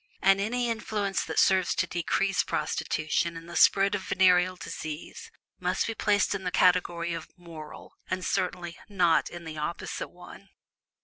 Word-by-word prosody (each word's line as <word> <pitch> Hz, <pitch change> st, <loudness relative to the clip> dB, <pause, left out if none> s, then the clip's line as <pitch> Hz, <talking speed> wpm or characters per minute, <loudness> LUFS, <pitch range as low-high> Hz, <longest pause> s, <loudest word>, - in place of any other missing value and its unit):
And 195 Hz, +1 st, +4 dB
any 240 Hz, +4 st, 0 dB
influence 210 Hz, -3 st, -1 dB
that -, -, -6 dB
serves 190 Hz, -2 st, +4 dB
to -, -, +1 dB
decrease 180 Hz, +3 st, 0 dB
prostitution 155 Hz, +2 st, -1 dB
and 165 Hz, 0 st, -10 dB
the 170 Hz, -, -9 dB
spread 195 Hz, +1 st, +5 dB
of 205 Hz, -, -1 dB
venereal 185 Hz, -1 st, +3 dB
disease, 155 Hz, -3 st, -7 dB, 0.3 s
must 180 Hz, +1 st, 0 dB
be 225 Hz, -, -2 dB
placed 205 Hz, -2 st, +2 dB
in 195 Hz, -1 st, -4 dB
the 180 Hz, -, -1 dB
category 175 Hz, -1 st, +2 dB
of 165 Hz, -1 st, -6 dB
"moral," 165 Hz, -3 st, -11 dB, 0.2 s
and 185 Hz, 0 st, -2 dB
certainly 175 Hz, -2 st, -2 dB
not 180 Hz, -5 st, +2 dB
in 175 Hz, 0 st, -9 dB
the 155 Hz, -1 st, -6 dB
opposite 160 Hz, +3 st, -4 dB
one. 180 Hz, +2 st, -14 dB
180 Hz, 160 wpm, -28 LUFS, 170-195 Hz, 0.3 s, spread